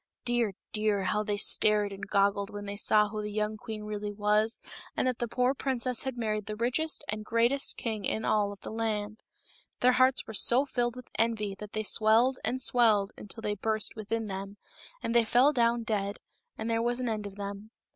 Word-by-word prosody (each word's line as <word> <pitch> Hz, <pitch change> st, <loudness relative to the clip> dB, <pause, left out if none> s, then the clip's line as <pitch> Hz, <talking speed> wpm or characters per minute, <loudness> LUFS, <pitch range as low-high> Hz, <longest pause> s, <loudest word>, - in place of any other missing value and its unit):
Dear, 240 Hz, -4 st, +1 dB, 0.2 s
dear, 210 Hz, -2 st, +1 dB
how 200 Hz, +3 st, 0 dB
they 205 Hz, -1 st, -2 dB
stared 210 Hz, 0 st, +3 dB
and 195 Hz, 0 st, -7 dB
goggled 200 Hz, 0 st, +1 dB
when 205 Hz, 0 st, -7 dB
they 200 Hz, 0 st, -5 dB
saw 210 Hz, 0 st, +3 dB
who 215 Hz, 0 st, -4 dB
the 210 Hz, 0 st, -5 dB
young 210 Hz, +1 st, -1 dB
queen 215 Hz, -1 st, -7 dB
really 210 Hz, 0 st, -4 dB
was, 210 Hz, +2 st, +1 dB, 0.4 s
and -, -, +1 dB
that 250 Hz, -2 st, -1 dB
the 240 Hz, -, -1 dB
poor 250 Hz, +3 st, +1 dB
princess 255 Hz, -3 st, -1 dB
had 260 Hz, -2 st, -3 dB
married 215 Hz, -3 st, -2 dB
the 215 Hz, -, -4 dB
richest 255 Hz, +8 st, 0 dB
and 215 Hz, 0 st, -4 dB
greatest 235 Hz, +5 st, +1 dB
king 220 Hz, -3 st, -3 dB
in 220 Hz, -, -1 dB
all 205 Hz, -1 st, +2 dB
of 200 Hz, -, -10 dB
the -, -, -7 dB
land! 215 Hz, -1 st, -3 dB, 0.6 s
Their 250 Hz, -, +5 dB
hearts 255 Hz, +1 st, +3 dB
were 220 Hz, -, -8 dB
so 245 Hz, +6 st, +4 dB
filled 240 Hz, -3 st, -1 dB
with 250 Hz, -1 st, -11 dB
envy 220 Hz, -3 st, 0 dB
that 210 Hz, -1 st, -9 dB
they 215 Hz, -, -2 dB
swelled 225 Hz, +5 st, +4 dB
and 260 Hz, 0 st, -2 dB
swelled 215 Hz, -6 st, +4 dB
until 210 Hz, +2 st, -7 dB
they 210 Hz, -, -1 dB
burst 215 Hz, +1 st, -1 dB
within 225 Hz, +1 st, -3 dB
them, 195 Hz, 0 st, -6 dB, 0.5 s
and 230 Hz, -, -1 dB
they 235 Hz, -1 st, +5 dB
fell 245 Hz, +6 st, +4 dB
down 235 Hz, -2 st, +2 dB
dead, 205 Hz, -2 st, -2 dB, 0.4 s
and 220 Hz, -, -4 dB
there 230 Hz, 0 st, +1 dB
was 240 Hz, +1 st, 0 dB
an 250 Hz, -, -2 dB
end 215 Hz, -2 st, -2 dB
of 195 Hz, -, -11 dB
them. 200 Hz, +1 st, -7 dB
215 Hz, 205 wpm, -29 LUFS, 210-240 Hz, 0.6 s, Their